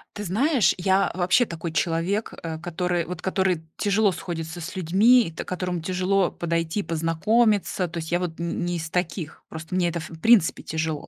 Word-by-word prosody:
Ты 205 - -5
знаешь, 250 - +2
я 190 +2 +2
вообще 185 +7 +3
такой 170 -3 -5
человек, 175 +6 -1
э, 160 -1 -4
который 175 0 -1
вот 175 -2 -6
который 190 -3 0
тяжело 205 0 +2
сходится 170 -1 -5
с 185 +5 -7
людьми, 190 +3 +4
та - - -4
которому 180 -1 -3
тяжело 185 +2 +1
подойти, 170 +3 -2
познакомиться. 180 +5 +1
То 170 +1 -8
есть 160 0 -5
я 175 - +2
вот 175 -3 -4
н 170 0 -2
не 175 0 -1
из 160 -1 -6
таких, 175 -3 -3
просто 160 +2 -8
мне 180 -1 +2
это 170 0 -3
в 160 0 -9
принципе 225 -7 +4
тяжело. 160 -1 -3
175 Hz, 180 wpm, -24 LUFS, 165-190 Hz, -, людьми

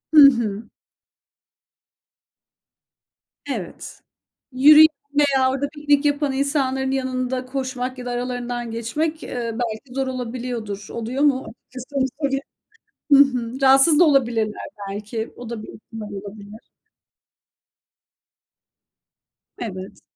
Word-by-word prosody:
Hı 300 - +10
hı. 220 -4 -3 2.9
Evet, - - -6 0.5
yürüyen 300 +4 +8 0.3
veya 270 -3 +3
orada 275 +2 -2
piknik 295 -1 +1
yapan 290 -1 +1
insanların 265 -1 0
yanında 255 -1 -2
koşmak 255 -1 -4
ya 250 - -8
da 245 - -3
aralarından 245 -1 -4
geçmek, 300 +8 -2
eee, 235 -2 -4
belki 235 +2 -4
zor 270 -1 -1
olabiliyordur. 240 -5 -5
Oluyor 235 +5 -2
mu? 275 -3 +2
Açıkçası 255 +4 -12
olsa 275 +1 -1
bile 270 - +1 0.7
Hı 280 - +9
hı. 255 -2 +2
Rahatsız 270 +3 +6
da - - +8
olabilirler 235 -8 +1 0.3
belki, 215 +3 -5
o 245 -2 -9
da 230 -2 -5
bir - - -11
ihtimal 215 -1 -10
olabilir. 205 +2 -9 3.0
Evet. 190 -4 -7
255 Hz, 105 wpm, -22 LUFS, 230-275 Hz, 3.0 s, Hı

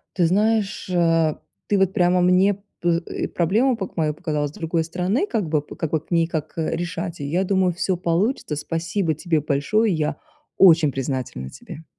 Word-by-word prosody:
Ты 180 - +3
знаешь, 205 +2 +1
э, 165 -3 +2 0.3
ты 205 - +2
вот 190 -1 +3
прямо 180 0 +3
мне 190 +2 +3 0.2
пы 170 -1 +1 0.2
и - - 0
проблему 220 +10 +1
пок 190 -5 -7
мою 155 -2 +1
показала 150 -1 -2
с - - -10
другой 165 +1 -2
стороны, 185 - -1
как 215 - -1
бы, 150 -2 +1
п - - -12
как 160 - -3
бы 160 - +1
к - - -28
ней 170 -1 +3
как, 160 -1 -5
э, 160 - -1
решать, 175 0 -4
и 145 - -4
я 170 +7 0
думаю 190 -2 +1
всё 180 +1 -1
получится. 175 - 0
Спасибо 165 +3 -2
тебе 160 0 0
большое. 160 +10 +1
Я 155 -2 -1 0.4
очень 165 -5 +6
признательна 125 - -4
тебе. 155 - -11
170 Hz, 190 wpm, -22 LUFS, 155-190 Hz, 0.4 s, очень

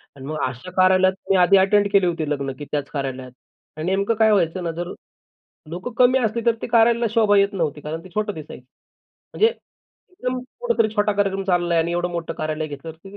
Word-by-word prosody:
आणि 135 -1 -10
मग 155 +1 -4
अशा 130 +8 -8
कार्यालयात 185 0 +4 0.2
मी 195 - +4
आधी 185 +2 +5
अटेंड 200 +2 +3
केली 195 -2 +5
होती 160 -3 -2
लग्न, 140 -2 -2
की 145 - -6
त्याच 145 -2 -2
कार्यालयात 130 -3 -5 0.5
आणि 155 - -4
नेमकं 200 +4 +1
काय 220 0 +4
व्हायचं 180 -2 +1
ना, 165 - -2
जर 175 +2 -5 0.8
लोकं 180 +8 -6
कमी 255 +1 +5
असली 230 0 -1
तर 230 -1 +3
ते - - -4
कार्यालयाला 235 0 +3
शोभा 210 -3 +4
येत 200 +1 +3
नव्हती 155 -5 -2
कारण 160 +2 -6
ते 185 - -13
छोटं 210 -1 -1
दिसायचं. 150 -5 -10 0.7
म्हणजे 440 - +4 0.6
एकदम 255 -7 -4 0.2
कुठेतरी 475 - +1
छोटा 210 -1 +2
कार्यक्रम 195 -1 -1
चाललाय 175 -2 +1
आणि 170 +1 0
एवढं 175 0 -1
मोठं 170 -1 -4
कार्यालय 155 0 -3
घेतल्यावरती 160 +7 -10
185 Hz, 195 wpm, -22 LUFS, 155-205 Hz, 0.8 s, आधी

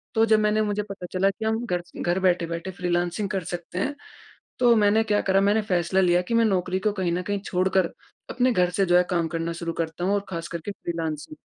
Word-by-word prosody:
तो 225 - +5
जब 220 -1 +4
मैंने 210 0 +2
मुझे 210 -1 -1
पता 200 -3 -8
चला 190 +2 +3
कि 220 +3 -5
हम 220 +2 0
घर 180 -3 -1
से, - - -13
घर 175 +2 +1
बैठे-बैठे 175 -1 0
फ्रीलांसिंग 175 +2 -1
कर 190 -4 -2
सकते 175 +1 -5
हैं। 285 +8 -1 0.6
तो 240 -2 +5
मैंने 215 0 +4
क्या 210 -1 +1
करा 195 0 +2
मैंने 205 +2 +3
फ़ैसला 185 -1 +1
लिया 175 -1 +3
कि 205 +6 -5
मैं 230 0 +4
नौकरी 185 -2 0
को 210 - +4
कहीं 185 -4 -1
न 180 - -1
कहीं 205 +1 -2
छोड़कर, 185 -1 +1 0.4
अपने 255 +1 +2
घर 180 -4 +2
से 195 +1 +1
जो 175 0 +4
है 180 - +5
काम 170 -2 +1
करना 165 +1 -3
शुरू 170 0 -4
करता 165 +1 -4
हूँ 200 - +2
और 200 - -2
ख़ासकर 170 -1 -5
के 205 - -3
फ्रीलांसिंग। 165 - -5
185 Hz, 235 wpm, -25 LUFS, 175-210 Hz, 0.6 s, तो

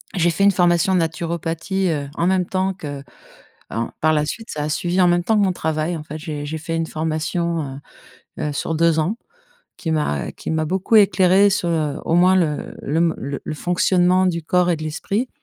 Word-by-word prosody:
J'ai 175 -2 +3
fait 195 - 0
une 200 - +6
formation 175 0 +3
naturopathie, 170 +2 -1
heu, 145 -3 -2
en 170 - 0
même 185 0 +2
temps 190 0 0
qu'en 145 -6 -9 0.8
par 155 0 +4
la 150 -1 +1
suite, 225 +8 -6
ça 150 -1 -3
a - - -2
suivi 175 +4 0
en 180 - +5
même 175 0 +2
temps 220 +4 +2
que - - +3
mon 190 -2 +2
travail. 160 0 -2
En 155 - -6
fait, 155 +1 -7
j'ai 150 -2 -5
j'ai 155 +2 -4
fait 165 +1 -4
une 165 0 -1
formation, 160 -2 -2 0.6
heu - - -2
heu, - - -4
sur 160 - -2
2 165 0 +3
ans 180 +9 -1 0.6
qui 165 - -4
m'a 150 - -1
qui - - -7
m'a 160 0 0
beaucoup 190 +7 +1
éclairée 195 -1 +5
sur, 185 -3 0
heu, 155 -4 0
au 165 - 0
moins, 180 +2 +5
le 165 -5 0
le 150 - -2
m 165 -1 +2 0.3
le - - -4
fonctionnement 180 +2 +2
du 170 -2 -1
corps 180 +2 +2
et 170 - +1
de 155 - -8
l'esprit. 195 +10 -2
170 Hz, 210 wpm, -21 LUFS, 155-185 Hz, 0.8 s, une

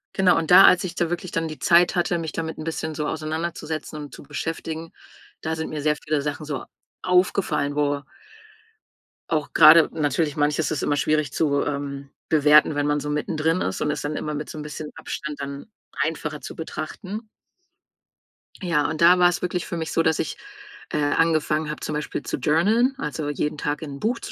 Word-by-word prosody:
Genau, 185 -2 +4
und 165 +1 -1
da, 185 +2 +10
als 180 - +6
ich 175 -2 -5
da 170 -1 0
wirklich 175 +1 -4
dann 165 0 -1
die 155 -1 -7
Zeit 175 +2 +4
hatte, 175 0 +1
mich 160 -2 -4
damit 160 -1 -4
'n 155 - -6
bisschen 160 -1 -3
so 150 -1 -2
auseinanderzusetzen 160 0 -4
und 145 - -9
zu - - -11
beschäftigen, 160 +2 -5 0.5
da 160 0 -2
sind 160 0 -4
mir 155 -1 -4
sehr 150 +1 +2
viele 150 0 -2
Sachen 145 +1 -4
so 145 -3 -4 0.4
aufgefallen, 180 -5 +1
wo 145 -1 0 1.3
auch 155 -3 -1
grade 155 +1 +8
natürlich, 150 0 0
manches 150 +1 +1
ist 150 - -2
immer 145 - +1
schwierig 155 -2 +1
zu, 140 -2 +1
ähm, 140 -1 -4 0.2
bewerten, 150 0 +5
wenn 145 0 0
man 145 0 +1
so 150 - -5
mittendrin 155 +3 0
ist, 95 - -2
und 150 - +1
es 150 -2 -3
dann 145 +2 -3
immer 150 0 -3
mit 150 0 -5
so - - -8
'n - - -5
bisschen 150 0 -6
Abstand 150 -1 -6
dann 140 +9 -7 0.2
einfacher 155 -1 -3
zu - - -8
betrachten. 185 +7 -6 1.3
Ja, 165 -6 +1
und 155 0 -4
da 175 +2 +7
war 180 0 +6
es 175 - -3
wirklich 180 0 -2
für - - -5
mich 160 -1 -4
so, 165 - +2
dass 160 -1 +2
ich, - - -3 0.5
äh, - - -1
angefangen 155 0 +1
habe, 150 - -5
zum - - -4
Beispiel 150 -1 -3
zu - - -3
journaln, 205 - +3
also 150 - -3
jeden 150 +1 -2
Tag 145 0 -2
in 145 -3 -6
'n - - -13
Buch 230 - -1
zu - - -8
155 Hz, 200 wpm, -24 LUFS, 150-165 Hz, 1.3 s, da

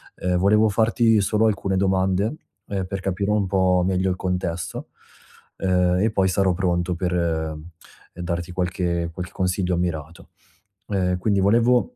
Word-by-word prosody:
Ehm, 90 0 -1
volevo 105 +4 +4
farti 115 +1 +3
solo 110 +3 +2
alcune 100 -2 -1
domande, 95 +5 +1 0.3
ehm, 95 -2 -2
per 100 +1 -4
capire 100 +2 -1
un 105 -2 +2
po' 90 -1 +2
meglio 95 0 +1
il 90 - 0
contesto, 90 -2 -3 0.7
ehm, 90 -1 +2
e 110 +2 +2
poi 95 -3 +2
sarò 95 0 +2
pronto 90 -1 0
per, 90 +1 -2
uhm, 80 -2 -2 0.5
darti 85 0 -4
qualche 90 -2 -1
qualche 90 +2 -7
consiglio 90 -1 -1
mirato. 80 -2 -4 0.6
Uhm, 90 -3 0
quindi 100 +1 +1
volevo, 120 - +3
95 Hz, 145 wpm, -23 LUFS, 90-100 Hz, 0.7 s, volevo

